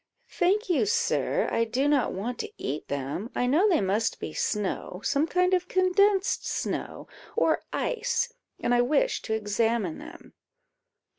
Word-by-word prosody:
"Thank 395 Hz, +4 st, +1 dB
you, 360 Hz, +3 st, +2 dB
sir; 475 Hz, +2 st, +1 dB
I 230 Hz, -, +2 dB
do 250 Hz, +5 st, 0 dB
not 290 Hz, -3 st, +2 dB
want 225 Hz, +6 st, -4 dB
to -, -, -4 dB
eat 145 Hz, +3 st, -4 dB
them; 140 Hz, -, -3 dB
I 245 Hz, -, +1 dB
know 320 Hz, +12 st, +4 dB
they 340 Hz, -, +3 dB
must 205 Hz, +4 st, 0 dB
be -, -, -5 dB
snow, 200 Hz, -3 st, -2 dB
some 285 Hz, +2 st, +1 dB
kind 360 Hz, +2 st, +2 dB
of 365 Hz, -1 st, +1 dB
condensed 380 Hz, +2 st, +2 dB
snow, -, -, -3 dB, 0.3 s
or 470 Hz, -, +2 dB
ice, 480 Hz, 0 st, -1 dB, 0.3 s
and 240 Hz, -, +1 dB
I 240 Hz, -, +5 dB
wished 310 Hz, -, +1 dB
to 220 Hz, -, 0 dB
examine 220 Hz, -3 st, 0 dB
them." -, -, -12 dB
285 Hz, 155 wpm, -27 LUFS, -, 0.3 s, I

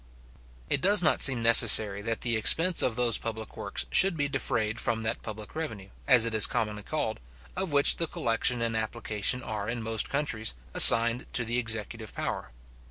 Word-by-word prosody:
It -, -, -1 dB
does 200 Hz, 0 st, +2 dB
not 155 Hz, -, 0 dB
seem 125 Hz, -4 st, +6 dB
necessary 110 Hz, -3 st, +5 dB
that 115 Hz, +1 st, -6 dB
the 120 Hz, -2 st, -2 dB
expense 165 Hz, +11 st, +2 dB
of 120 Hz, -, -3 dB
those 120 Hz, -3 st, 0 dB
public 110 Hz, -1 st, -9 dB
works 100 Hz, -, -5 dB
should 190 Hz, -2 st, +3 dB
be 145 Hz, -1 st, -2 dB
defrayed 110 Hz, -4 st, -4 dB
from 115 Hz, -1 st, -4 dB
that 110 Hz, +1 st, -5 dB
public 110 Hz, -1 st, -10 dB
revenue, 110 Hz, -12 st, -8 dB, 0.2 s
as 125 Hz, -4 st, +4 dB
it 115 Hz, -, -4 dB
is 110 Hz, -2 st, +5 dB
commonly 105 Hz, -1 st, -5 dB
called, 110 Hz, -1 st, -6 dB, 0.4 s
of 190 Hz, -3 st, -5 dB
which 140 Hz, 0 st, +3 dB
the 165 Hz, -, -2 dB
collection 115 Hz, -1 st, -3 dB
and 115 Hz, -1 st, -4 dB
application 110 Hz, +2 st, -4 dB
are 105 Hz, -1 st, -7 dB
in 115 Hz, -1 st, -6 dB
most 110 Hz, -1 st, -2 dB
countries, 120 Hz, -, -3 dB, 0.2 s
assigned 115 Hz, +2 st, +6 dB
to 120 Hz, -, +1 dB
the 120 Hz, +2 st, -3 dB
executive 110 Hz, -1 st, -6 dB
power. -, -, -6 dB
115 Hz, 180 wpm, -25 LUFS, 110-125 Hz, 0.4 s, seem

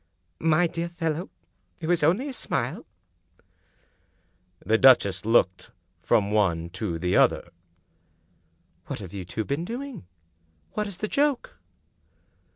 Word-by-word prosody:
" 80 Hz, -, -46 dB, 0.2 s
My 175 Hz, +3 st, +4 dB
dear 170 Hz, 0 st, -3 dB
fellow, 170 Hz, 0 st, -3 dB, 0.7 s
only 185 Hz, -, +2 dB
a 275 Hz, -, -5 dB
smile! -, -, -3 dB, 0.9 s
" 90 Hz, 0 st, -35 dB
The 110 Hz, +4 st, +3 dB
duchess 100 Hz, -8 st, +5 dB
looked 100 Hz, -5 st, +2 dB, 0.3 s
from 100 Hz, 0 st, +2 dB
one 85 Hz, -6 st, +1 dB
to 95 Hz, -2 st, -3 dB
the 90 Hz, +2 st, 0 dB
other. -, -, +3 dB, 1.4 s
"What -, -, -4 dB
have 95 Hz, -2 st, -9 dB
you 95 Hz, -3 st, -6 dB
two 95 Hz, +6 st, -4 dB
been 140 Hz, +4 st, -2 dB
doing? 245 Hz, -, -6 dB, 0.6 s
What 210 Hz, 0 st, -2 dB
is 200 Hz, -3 st, -7 dB
the 215 Hz, -, -3 dB
joke?" 285 Hz, +2 st, 0 dB
115 Hz, 125 wpm, -26 LUFS, -, 1.4 s, duchess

